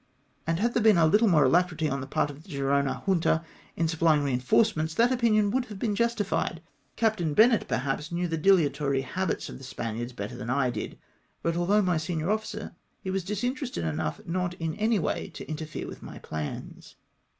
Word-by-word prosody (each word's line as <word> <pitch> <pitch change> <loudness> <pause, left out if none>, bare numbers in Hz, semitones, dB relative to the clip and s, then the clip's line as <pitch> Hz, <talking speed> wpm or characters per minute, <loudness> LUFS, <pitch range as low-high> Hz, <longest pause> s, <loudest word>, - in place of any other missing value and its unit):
And 165 +1 +1
had 235 +3 +1
there 235 - +2
been 215 -3 +6
a 165 -1 +5
httle 210 +6 +4
more 155 -5 +5
alacrity 160 +2 +2
on 135 -2 -2
the 135 - -6
part 145 +1 0
of 145 +1 -12
the 185 - -19
Gerona 140 -1 0
Junta 170 -4 +2 0.3
in 165 - +2
supplying 160 -2 +3
reinforcements, 155 - +1
that 240 +2 +4
opinion 215 -5 +3
would 255 +2 0
have 210 -5 -9
been 210 0 -1
justified. 210 -7 0 0.3
Captain 210 -10 +1
Bennett 230 0 +5
perhaps 135 +4 -2
Imew 175 +1 -1
the 165 - -1
dilatory 150 -6 +3
habits 185 +7 -2
of - - -9
the - - -12
Spaniards 120 -1 -4
better 105 -3 -6
than 115 - -6
I 130 -1 +2
did; - - -5 0.5
but 165 0 0
although 195 +5 +3
my 180 -3 +2
senior 160 +1 -2
ofiicer, 215 0 -3 0.3
he 190 - -2
was 190 -1 -1
disin 210 +7 -1
terested 250 - -4
enough 80 0 -2
not 180 +1 -2
in 165 -2 -3
any 215 +4 +1
way 175 - -2
to - - -8
interfere 155 0 -5
with - - -9
my - - -9
plans. 75 -1 -7
170 Hz, 195 wpm, -27 LUFS, 145-210 Hz, 0.5 s, been